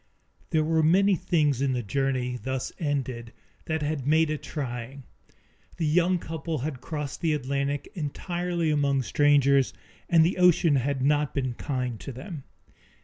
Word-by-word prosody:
There 155 -1 +2
were 160 +1 +2
many 190 +5 +4
things 155 -7 +1
in 135 -1 +1
the 125 -1 -2
journey, 125 +1 -1
thus 130 +2 -3
ended, 130 -7 -3 0.3
that 160 -1 -2
had 145 -3 -2
made 160 +1 +3
it 155 - -3
trying. 130 -1 -5 0.7
The 165 - -1
young 180 +4 +3
couple 160 -1 -4
had 135 -1 -4
crossed 150 0 -5
the 160 -2 +2
Atlantic 140 +1 -2
entirely 175 +1 -2
among 140 -2 +1
strangers 140 0 +3 0.4
and 165 -2 +6
the 180 +2 0
ocean 175 -4 +5
had 135 +1 -1
not 145 +1 +1
been 130 -3 -1
kind 125 -3 -3
to - - -7
them. 135 - -8
145 Hz, 150 wpm, -27 LUFS, 130-160 Hz, 0.7 s, and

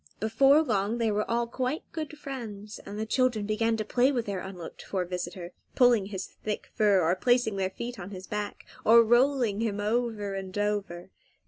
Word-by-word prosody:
Before 270 +8 +4
long 215 -3 0
they 230 -2 +1
were 210 +1 -1
all 235 +1 +1
quite 255 +5 -2
good 310 -1 -5
friends, 220 -7 -7
and 205 - -6
the 220 - -2
children 240 -2 +1
began 225 +2 +1
to 215 - -2
play 250 +5 +3
with 240 -4 -1
their 200 -2 -3
unlooked 180 -3 -8
for 185 -2 -2
visitor, 175 0 -5 0.2
pulling 240 -6 +4
his 190 -2 -5
thick 210 -1 -6
fur, 200 -4 +4
or 170 +3 +3
placing 240 -1 +2
their 190 -1 0
feet 235 +4 -6
on 180 0 -7
his 190 -2 -8
back, 210 +2 -5 0.2
or 230 +1 +7
rolling 240 -2 +3
him 210 -3 -1
over 215 -1 -1
and 190 0 -5
over. 200 -4 -2
215 Hz, 190 wpm, -28 LUFS, 195-240 Hz, 0.2 s, or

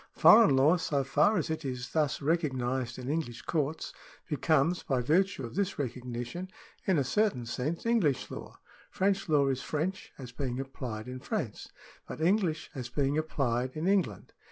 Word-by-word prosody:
Foreign 215 -10 +7
law, 145 +7 +5
so 145 -4 0
far 150 +10 +3
as 160 -2 -1
it 160 0 -3
is 125 -2 -4
thus 150 -3 0
recognised 130 -6 0
in 125 -1 -7
English 140 -6 -3
courts, 155 -1 -2 0.3
becomes, 160 +2 +2
by 130 -2 0
virtue 160 +3 +1
of 115 - -8
this 195 +1 -1
recognition, 125 +6 -4 0.4
in 190 -4 +3
a 140 - +3
certain 195 - +1
sense 135 - -3
English 205 - +1
law. - - -8 0.3
French 195 -1 0
law 145 -3 +4
is 130 -1 0
French 165 +8 -3
as 125 -3 -8
being 125 0 -3
applied 125 -5 -5
in 130 0 -6
France, 140 - -4 0.4
but - - -7
English 170 -2 +1
as 125 -3 -5
being 140 +2 0
applied 130 -5 -1
in 160 +4 -1
England. 185 - 0
145 Hz, 165 wpm, -30 LUFS, 125-170 Hz, 0.4 s, Foreign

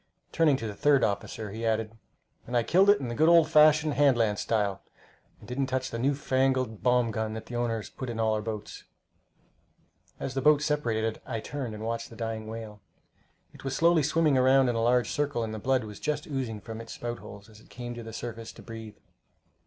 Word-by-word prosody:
Turning 155 -4 +3
to 115 - -6
the 105 - -4
third 140 +5 +3
officer, 105 +1 -2
he 110 +3 -6
added, 110 -1 -1 0.5
"And 120 +1 0
I 120 - +2
killed 190 - +4
it 205 - +6
in 130 - -4
the 120 - -3
good 155 +6 +4
old 170 -2 +6
fashioned 155 -1 +5
hand 140 -4 +4
lance 105 -3 +1
style, 105 -4 0 0.6
and 105 - -16
didn't 130 +3 -1
touch 130 0 -2
the 115 - -4
new 140 +3 +2
fangled 130 -5 0
bomb 125 -2 +2
gun 110 0 -3
that 110 - -7
the 120 - -7
owners 115 -3 -2
put 130 - -6
in 115 -1 -4
all 110 -1 +2
our 110 - -1
boats." 105 -1 -6 1.3
As 135 - -4
the 135 - -1
boats 150 +1 +4
separated, 115 -7 -1
I 115 -3 -4
turned 125 -2 -5
and 105 - -7
watched 115 0 -3
the 115 - -12
dying 115 -1 -4
whale. 110 -2 -8 0.7
It - - -14
was 135 -1 -3
slowly 170 -1 +4
swimming 150 -1 +2
around 130 0 +5
in 120 - 0
a 115 - 0
large 120 +1 +2
circle, 145 -5 -1
and 110 -1 -4
the 110 - -5
blood 130 +2 +1
was 105 -1 -9
just 150 - -2
oozing 125 -7 -4
from 115 +1 -7
its 115 - -9
spout 120 0 -5
holes 100 +1 -11
as 110 -1 -16
it - - -20
came 120 -1 -7
to 120 - -7
the 115 0 -8
surface 115 0 -6
to - - -13
breathe. 110 -2 -9
120 Hz, 225 wpm, -28 LUFS, 110-135 Hz, 1.3 s, it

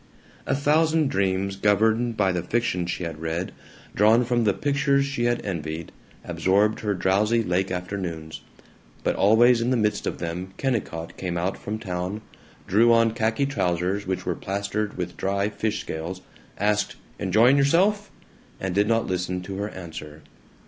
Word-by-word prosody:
A - - +2
thousand 155 +1 +2
dreams 95 0 0
governed 110 +3 +2
by 95 -2 +3
the 90 -1 -1
fiction 90 -2 -1
she 90 - -3
had 80 -2 -5
read, 80 +3 -3 0.4
drawn 110 +4 +4
from 120 -1 +1
the 100 - +3
pictures 140 -1 +1
she 140 -4 -2
had 120 0 0
envied, 80 -4 -4 0.3
absorbed 95 +6 +2
her 105 -2 -1
drowsy 105 +6 +2
lake 95 0 0
afternoons, 90 -4 -5 0.6
but - - +1
always 115 +4 +5
in 120 - 0
the 130 - +2
midst 105 -2 0
of - - -2
them 90 +2 -5
Kennicott 105 -11 -3
came 90 -2 -3
out 90 +3 -1
from 105 +1 -5
town, 95 0 -4 0.5
drew 115 +5 +5
on 115 -1 +4
khaki 110 +4 +1
trousers 90 -6 -1
which 95 -1 -2
were - - 0
plastered 100 +2 -3
with 90 -1 -4
dry 100 +1 0
fish 110 0 -2
scales, 85 +4 -5 0.4
asked, 105 0 +1 0.2
"Enjoying 110 +8 +4
yourself?" 190 +9 +3 0.5
and 95 -1 -2
did 100 +2 +2
not 115 0 +2
listen 90 0 -2
to 95 +1 -6
her 100 +1 -2
answer. 80 -5 -9
100 Hz, 160 wpm, -25 LUFS, 90-115 Hz, 0.6 s, always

